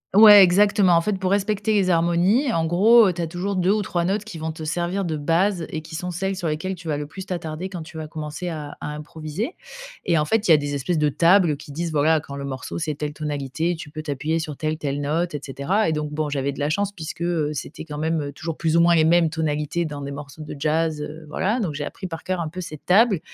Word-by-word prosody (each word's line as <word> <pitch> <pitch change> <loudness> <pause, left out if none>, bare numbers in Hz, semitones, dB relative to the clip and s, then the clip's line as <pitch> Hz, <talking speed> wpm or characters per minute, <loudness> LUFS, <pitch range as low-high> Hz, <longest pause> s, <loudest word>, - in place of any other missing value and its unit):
Ouais, 210 -1 +10
exactement. 195 +1 +5
En 170 - +4
fait, 195 +2 -1
pour 185 -1 -1
respecter 205 +1 +1
les 195 -3 +2
harmonies, 175 - +3
en 165 -1 +1
gros, 210 +7 +6
heu, - - -1
tu 175 - -4
as 165 - -1
toujours 185 +4 -3
2 185 +2 +2
ou 215 - +1
3 175 -3 -1
notes 195 +3 0
qui 210 -6 -9
vont 160 0 -4
te 160 - -8
servir 175 +5 -1
de 160 -4 -2
base 170 +4 +1
et 155 - -4
qui 160 +1 -10
sont 180 +2 -4
celles 190 +2 -2
sur 175 -3 -2
lesquelles 175 +5 -2
tu 170 -2 -11
vas 150 - 0
le 150 - -4
plus 190 +4 -8
t'attarder 170 -1 -4
quand 185 -3 -7
tu 160 0 -11
vas 155 - -5
commencer 155 +2 -6
à 150 -3 -6
à - - -5
improviser, 155 - -5 0.5
et, 170 -2 +2
en 150 - +3
fait, 220 +5 +1
il - - +5
y - - +10
a - - +7
des 145 0 -3
espèces 150 +5 -1
de 150 -1 +2
tables 170 +1 +4
qui 145 - -11
disent: 170 +2 -3
«Bah, 150 - 0
voilà 160 +2 +4
quand 140 -2 -9
le 140 - -5
morceau, 130 -2 -5
c'est 155 -3 -2
telle 150 0 -3
tonalité, 150 +3 -2
tu 160 - -9
peux 155 +1 -6
t'appuyer 155 +2 -2
sur 155 -2 -5
telle, 155 0 -2
telle 145 -2 -3
note, 160 +3 -1
et - - -2
cetera», 150 +9 0
et - - +1
donc 150 -1 -3
bon, 150 0 -2
j'avais 140 -1 -1
de - - -10
la 145 - 0
chance 200 +5 0
puisque, 160 -2 -7
heu, 165 -4 0
c'était 150 +1 -6
quand 150 -2 -7
même 155 -2 -1
toujours 165 +2 -5
plus 160 -1 0
ou - - +5
moins 170 0 +5
les 160 - +4
mêmes 165 0 +4
tonalités 155 +1 -1
dans 145 -2 -6
des 140 0 -5
morceaux 145 +1 -9
de 150 - -7
jazz, 155 +1 0
heu, 155 +2 -7
voilà. 200 +10 -1
Donc 175 -9 -2
j'ai 145 0 -4
appris 190 - -6
par 165 -2 -7
cœur, 185 -1 -2
un 165 - -2
peu, 185 +4 -6
cette 155 -4 -9
table, 200 0 +4
165 Hz, 275 wpm, -23 LUFS, 150-185 Hz, 0.5 s, Ouais